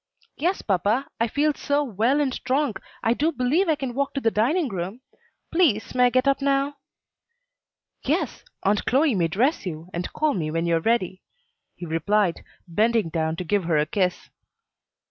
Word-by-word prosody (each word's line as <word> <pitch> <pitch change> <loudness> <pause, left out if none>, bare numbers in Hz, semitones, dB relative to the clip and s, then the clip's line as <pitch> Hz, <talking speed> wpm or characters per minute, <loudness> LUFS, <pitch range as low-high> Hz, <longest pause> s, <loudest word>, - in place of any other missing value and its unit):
"Yes, 355 +6 -1
papa, 205 +7 +1
I 230 - +2
feel 295 +5 +1
so 285 +1 0
well 240 +3 +1
and 275 -3 +1
strong 270 -1 0 0.3
I 225 - +3
do 305 +6 +1
believe 300 +7 +1
I 315 - +4
can 265 -4 -4
walk 280 +3 -2
to - - +1
the 225 -4 +1
dining 285 - +1
room. 195 +3 -5 0.5
Please, 310 - +2
may 250 -1 +4
I - - +5
get 255 +2 +1
up 275 0 +2
now?" 275 +1 +1 1.3
"Yes; - - -1 0.2
Aunt 205 +1 +2
Chloe 280 +2 +3
may 175 -5 +1
dress 245 - +1
you, 165 0 -6
and 175 +1 -4
call 310 -1 +1
me 160 -6 -2
when 165 +2 -1
you 170 -1 +2
are - - -3
ready," 190 -3 0 0.5
he 175 - -7
replied, 170 +3 0 0.2
bending 215 +2 +1
down 160 0 -1
to 180 - -4
give 195 +1 0
her 165 -2 +2
a 150 - +2
kiss. 180 +2 -1
230 Hz, 185 wpm, -24 LUFS, 180-280 Hz, 1.3 s, I